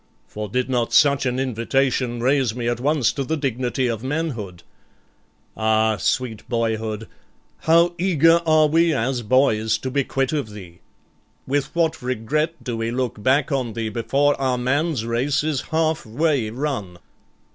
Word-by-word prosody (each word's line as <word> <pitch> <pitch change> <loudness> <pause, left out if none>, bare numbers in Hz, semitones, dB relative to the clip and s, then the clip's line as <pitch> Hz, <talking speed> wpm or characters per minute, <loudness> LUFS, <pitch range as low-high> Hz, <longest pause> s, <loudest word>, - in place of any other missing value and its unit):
for 105 0 -6
did 125 +4 -1
not 120 -3 0
such 140 -3 +4
an 125 0 -1
invitation 125 0 0
raise 130 -2 +1
me 120 -1 -3
at 120 0 -1
once 145 -2 +1
to 140 - -2
the 160 +5 -2
dignity 130 -2 -1
of 115 -2 -2
manhood. 130 - -4 0.9
Ah, 110 0 +2
sweet 115 -3 -1
boyhood, 110 -2 -2 0.5
how 170 +2 +4
eager 170 -2 +4
are 155 -1 +5
we 165 +2 +3
as 125 +2 -1
boys 110 -2 +2
to 130 +3 -5
be 140 +1 +1
quit 135 +2 -1
of 145 -8 -2
thee, 95 -5 -11 0.7
with 140 +3 -2
what 165 -2 +1
regret 140 +7 -2
do 120 -3 -3
we 115 0 -2
look 120 -3 -3
back 135 +6 +2
on 130 -5 -1
thee 110 0 -3
before 135 +7 +1
our 130 -2 +1
man's 130 +1 0
race 125 +6 0
is 150 -4 -1
half 160 -1 0
way 130 0 0
run! 115 -8 -4
130 Hz, 155 wpm, -22 LUFS, 115-145 Hz, 0.9 s, are